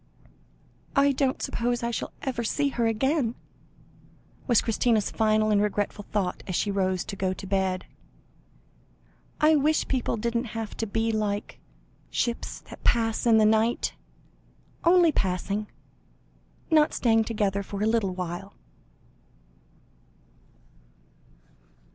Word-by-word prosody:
"I 280 0 +5
don't 265 -1 0
suppose 240 +1 -1
I 235 - 0
shall - - -4
ever 255 -4 -2
see 285 +5 0
her 235 -4 0
again," 245 +2 +1 1.1
was 240 -4 +5
Christina's 225 -1 +1
final 215 -1 +2
and 205 -1 +4
regretful 205 0 -2
thought, 195 -4 -1
as 185 - -2
she 205 - 0
rose 190 -2 0
to 200 - -6
go 190 -1 -1
to 190 - -9
bed. 190 -1 -1 1.5
"I 310 +1 +5
wish 305 +2 +2
people 255 -3 -1
didn't 235 +1 -2
have 225 -2 -5
to 225 - -2
be 225 +2 0
like 210 -2 -2 0.5
'ships 235 -1 -2
that - - -13
pass 225 0 +1
in 225 -1 +6
the 215 - +5
night' 220 +2 +2 0.9
only 345 -1 +5
passing 200 - -1 1.0
not 305 -1 +4
staying 225 -2 +3
together 205 -3 0
for 200 +1 -4
a - - +2
little 220 -4 +1
while." 180 +2 -5
220 Hz, 125 wpm, -26 LUFS, 200-240 Hz, 1.5 s, in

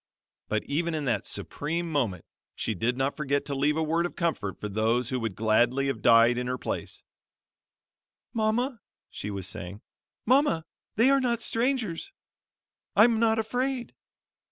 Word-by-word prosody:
But 110 0 -1
even 165 +3 -1
in 150 -2 -2
that 115 -6 0
supreme 165 +4 -3
moment 115 - -1 0.3
she 110 - -2
did 115 +6 -1
not 135 +1 0
forget 140 -2 -1
to 140 - -3
leave 145 +3 +1
a 160 - +1
word 165 +2 +1
of - - -14
comfort 160 - -2
for 105 - -4
those 115 +4 0
who 130 - -1
would 115 -5 -3
gladly 120 +5 +2
have 135 -5 -2
died 115 +1 +6
in 125 - -3
her 125 0 -1
place: - - -5 1.3
"Mama," 230 +2 0 0.3
she 105 - -5
was 100 -3 -3
saying, 100 +1 -7 0.4
"Mama, 255 - +3 0.3
they 235 +5 +5
are 275 0 +4
not 240 -2 +1
strangers. 230 -7 -1 0.8
I'm 225 +2 +6
not 225 -1 +3
afraid." 245 +3 -2
145 Hz, 155 wpm, -27 LUFS, -, 1.3 s, died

